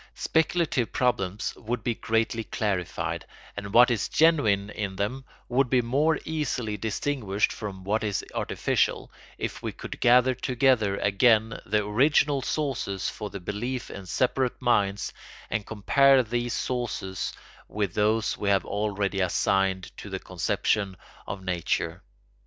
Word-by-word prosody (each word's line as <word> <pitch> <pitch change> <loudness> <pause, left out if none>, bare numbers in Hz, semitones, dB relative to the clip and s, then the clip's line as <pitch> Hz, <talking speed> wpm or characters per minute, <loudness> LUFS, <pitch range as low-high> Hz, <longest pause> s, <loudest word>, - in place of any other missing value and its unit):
Speculative 160 -6 +1
problems 110 -5 0
would 120 +2 -4
be 120 - +1
greatly 115 0 0
clarified, 85 -6 -2 0.3
and 100 -1 -6
what 120 +3 +7
is 110 -4 0
genuine 110 -12 +3
in 100 -2 -4
them 115 +8 -2 0.2
would 130 +1 +2
be 125 -1 +3
more 145 +7 +2
easily 140 -9 -2
distinguished 105 0 -1
from 100 -4 -7
what 105 +4 0
is 105 -3 -1
artificial, - - 0 0.3
if - - -4
we - - -3
could - - -8
gather 125 +1 +5
together 125 -5 +2
again 110 +3 +3
the 105 +1 +1
original 140 +5 +3
sources 125 -9 -2
for 105 -1 -6
the 100 - -7
belief 120 +7 -4
in 95 -1 -8
separate 125 +6 0
minds 105 -5 +1 0.4
and 105 - -2
compare 135 +5 +4
these 120 +1 -2
sources 120 -7 -3 0.4
with 105 -4 -2
those 105 +1 +1
we 100 - -2
have 100 -1 +3
already 100 -1 -1
assigned 95 0 +1
to - - -8
the - - -3
conception 100 -3 -1 0.3
of 95 -1 -5
nature. 90 -3 -1
110 Hz, 135 wpm, -27 LUFS, 100-125 Hz, 0.4 s, what